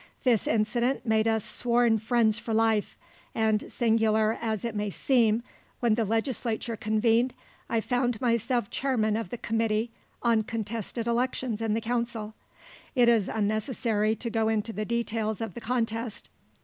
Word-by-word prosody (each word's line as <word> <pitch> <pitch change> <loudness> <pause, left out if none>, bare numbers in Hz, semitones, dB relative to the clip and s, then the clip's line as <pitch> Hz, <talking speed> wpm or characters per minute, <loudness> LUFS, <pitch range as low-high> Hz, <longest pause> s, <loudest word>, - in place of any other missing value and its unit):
This 240 -5 +2
incident 235 +4 +1
made 220 -1 +2
us 220 -2 +1
sworn 235 -2 +2
friends 220 0 +2
for 225 -1 -3
life, 220 -2 +1 0.4
and 220 -1 +1
singular 220 -1 +2
as 220 -2 -2
it 230 - -2
may 210 0 -1
seem, 230 0 +2 0.4
when 235 -3 +3
the 225 0 +1
legislature 225 +1 -1
convened, 225 +3 +1 0.3
I 230 -1 +1
found 245 -1 0
myself 235 -2 0
chairman 225 -6 +1
of 225 -5 -3
the 245 - -5
committee 225 0 0 0.3
on 230 -2 +3
contested 225 +1 -4
elections 240 -1 -1
in 220 -1 0
the 225 - -1
council. 235 -2 -2 0.6
It 245 -2 +5
is 225 -5 +3
unnecessary 215 0 0
to 235 +2 -4
go 220 0 +1
into 220 0 -1
the 215 0 -3
details 225 -2 -1
of 225 -5 -4
the 235 - -8
contest. 225 -1 -2
225 Hz, 150 wpm, -27 LUFS, 215-235 Hz, 0.6 s, It